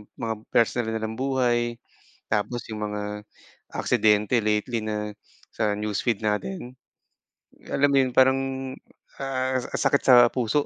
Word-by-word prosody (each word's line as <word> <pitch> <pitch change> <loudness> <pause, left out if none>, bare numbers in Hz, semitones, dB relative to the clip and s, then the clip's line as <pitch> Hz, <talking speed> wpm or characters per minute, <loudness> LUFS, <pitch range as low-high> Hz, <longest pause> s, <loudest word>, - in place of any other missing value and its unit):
yung - - -14
mga 115 -1 -2 0.2
personal 115 0 +2
nilang 110 0 -3
buhay, 120 -3 +1 0.6
tapos 110 +3 -1
yung 105 -1 -3
mga 105 0 -3 0.7
aksidente 105 +2 +2
lately 110 +2 0
na 105 -1 -3 0.4
sa 105 -2 0
newsfeed 105 +1 -1
natin. 125 - -2 1.0
Alam 145 +1 +3
mo 140 - +4
yun 130 - -2
parang, 130 0 +5 0.8
ah, 130 -1 -1
ang - - -5
sakit 140 0 +3
sa 130 - +7 0.2
puso. 125 +4 0
120 Hz, 130 wpm, -25 LUFS, 105-130 Hz, 1.0 s, sa